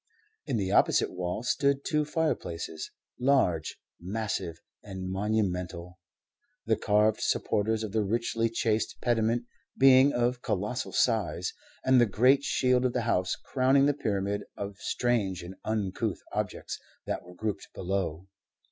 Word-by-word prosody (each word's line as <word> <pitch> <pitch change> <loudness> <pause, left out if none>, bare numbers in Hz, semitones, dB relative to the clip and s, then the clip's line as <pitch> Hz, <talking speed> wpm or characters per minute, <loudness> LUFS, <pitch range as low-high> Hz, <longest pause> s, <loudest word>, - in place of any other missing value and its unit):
In 125 - 0
the 95 -2 -1
opposite - - +3
wall 90 +4 -3
stood 140 +2 +1
two 150 -1 +1
fireplaces, 145 - -2 0.3
large, 125 - +2 0.2
massive, 95 -3 -3 0.2
and 95 -2 -6
monumental, 90 -3 -2 0.7
the 110 - +3
carved 105 0 +2
supporters 110 +2 0
of 110 - -4
the 110 +1 +1
richly 115 +2 0
chased 110 -1 -1
pediment 120 0 +1 0.3
being 135 +1 +7
of 120 0 0
colossal 105 +3 -2
size, 95 -7 +1 0.3
and 130 -1 +6
the 120 - +5
great 130 +7 +4
shield 125 -2 +2
of 125 -1 +1
the - - 0
house 95 -6 +1
crowning 135 +1 +2
the 145 - +3
pyramid 100 -6 -1 0.2
of 100 0 -5
strange 105 -8 0
and 90 +2 -8
uncouth 105 -4 -2
objects - - -3 0.3
that - - -2
were 90 +1 -14
grouped 105 +1 -3
below. 95 -2 -2
110 Hz, 135 wpm, -29 LUFS, 95-125 Hz, 0.7 s, being